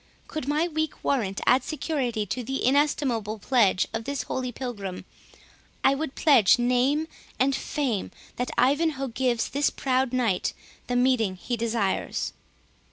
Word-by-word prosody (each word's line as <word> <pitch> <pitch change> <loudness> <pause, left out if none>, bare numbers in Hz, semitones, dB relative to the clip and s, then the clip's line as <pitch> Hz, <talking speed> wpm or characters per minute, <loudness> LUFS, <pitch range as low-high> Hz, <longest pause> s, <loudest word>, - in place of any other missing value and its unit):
Could 310 -4 -5
my 305 +4 +1
weak 315 -1 -3
warrant 210 -8 0
add 255 +1 +4
security 260 -8 -2
to 250 +5 -3
the 270 +3 -2
inestimable 255 -6 +1
pledge 210 -4 +2
of 225 0 -3
this 280 -1 -2
holy 255 -1 -3
pilgrim, 210 -7 -6 0.8
I 270 - +5
would 275 0 -4
pledge 260 - +5
name 250 +6 +2 0.3
and 270 +1 +2
fame 255 -10 -2 0.3
that 245 - -2
Ivanhoe 275 +2 +2
gives 240 -1 0
this 285 +1 +1
proud 260 -1 0
knight 235 -8 0 0.3
the 245 - -1
meeting 245 -6 +2
he 240 +6 -3
desires." 225 -4 -1
255 Hz, 140 wpm, -26 LUFS, 230-280 Hz, 0.8 s, I